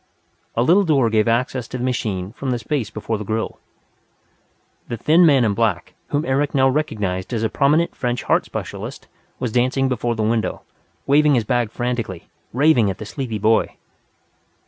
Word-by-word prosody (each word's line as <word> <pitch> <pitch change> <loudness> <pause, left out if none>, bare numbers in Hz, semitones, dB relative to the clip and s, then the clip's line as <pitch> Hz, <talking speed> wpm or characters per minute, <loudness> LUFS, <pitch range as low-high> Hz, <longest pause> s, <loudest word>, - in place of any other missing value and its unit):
A 115 - +2
little 180 +9 +5
door 140 - +2
gave 110 0 +2
access 120 +1 0
to 125 - -5
the 125 - -4
machine 105 -7 -2
from 135 +2 -5
the 125 - 0
space 120 -2 -2
before 110 0 -4
the - - -4
grill. 110 +2 -3 1.3
The 120 - -4
thin 165 +9 +5
man 135 -5 +4
in 105 - +1
black, 105 -5 -1
whom 145 +2 -1
Eric 140 +2 0
now 135 -1 +4
recognized 105 -10 -2
as 115 -1 -1
a 110 - +1
prominent 150 +8 +2
French 120 -2 -2
heart - - +2
specialist, - - -7 0.3
was 125 -3 -3
dancing 130 +3 +1
before 120 -1 -1
the 110 - -1
window, 110 +1 -1 0.4
waving 145 +1 +4
his 120 - +2
bag 120 +1 0
frantically, 115 -6 -4 0.2
raving 125 -5 +3
at 95 - -4
the 110 - -7
sleepy 115 0 -4
boy. 110 +2 +2
120 Hz, 175 wpm, -21 LUFS, 110-135 Hz, 1.3 s, little